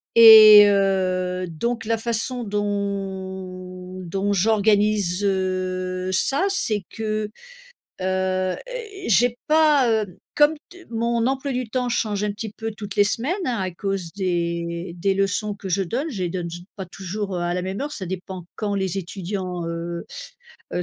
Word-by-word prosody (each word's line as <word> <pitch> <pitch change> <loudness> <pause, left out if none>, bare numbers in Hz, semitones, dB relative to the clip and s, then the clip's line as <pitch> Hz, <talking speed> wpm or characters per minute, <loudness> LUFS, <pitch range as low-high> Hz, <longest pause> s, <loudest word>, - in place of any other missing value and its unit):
et 215 -2 +11
heu, 185 -2 +1
donc 230 +10 -3
la 225 +1 +1
façon 235 +2 -2
dont 190 -3 -4
dont 195 +4 -2
j'organise 205 -2 +2
heu, 185 -1 -1
ça, 275 - +2
c'est 215 - 0
que, 215 -1 -3 0.7
heu - - -3
heu, 185 0 0
é, 440 -6 -8
j'ai 235 +4 +3
pas 305 -4 +4
heu, 215 -5 -1 0.2
comme 295 +1 +5 0.2
t 360 -1 -14
mon 235 0 0
emploi 270 +1 -2
du 250 -3 -3
temps 250 +1 -1
change 210 -4 -1
un 210 - -1
petit 215 +1 -6
peu 225 0 -4
toutes 205 -2 -8
les 205 - +5
semaines 245 - 0
hein, 245 -3 -1
à 185 -1 -2
cause 185 -1 -4
des 170 -2 -2
des 195 +2 +1
leçons 195 +2 0
que 195 -1 -8
je 195 +2 +1
donne, 265 - -3
je 195 -9 -3
les - - -1
donne, 170 -1 -4
j 175 +1 -8
pas 190 -2 -6
toujours 195 +2 -5
heu, 175 - -2
à 175 0 -1
la 180 - -2
même 190 +2 -4
heure, 290 +2 -3
ça 195 - -5
dépend 185 0 -6
quand 205 -2 -2
les 190 -1 -1
étudiants 185 -1 -4
heu 170 +1 -4 0.7
heu 180 - 0
195 Hz, 165 wpm, -23 LUFS, 185-225 Hz, 0.7 s, et